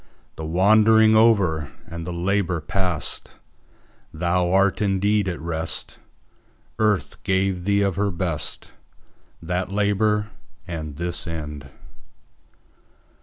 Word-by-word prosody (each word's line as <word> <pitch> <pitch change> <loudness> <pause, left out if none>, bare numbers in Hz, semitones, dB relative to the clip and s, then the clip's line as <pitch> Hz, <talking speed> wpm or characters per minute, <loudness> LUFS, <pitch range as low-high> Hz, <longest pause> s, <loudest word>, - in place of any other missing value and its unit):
The 80 - -6
wandering 110 +6 +5
over, 100 -10 +3 0.2
and 85 -1 -7
the - - -3
labour 90 0 0
passed, 90 -1 -2 0.8
Thou 90 +2 0
art 100 +1 +3
indeed 100 0 +1
at 90 -2 -3
rest:Earth 85 +3 -4
gave 95 -1 0
thee 100 0 +2
of 100 -3 -1
her 100 0 +1
best, 85 -4 -3 0.7
That 90 +2 -2
labour 105 +1 +1 0.4
and 80 -4 -5
this 85 +1 -4
end. 75 -4 -6
90 Hz, 100 wpm, -23 LUFS, 85-100 Hz, 0.8 s, wandering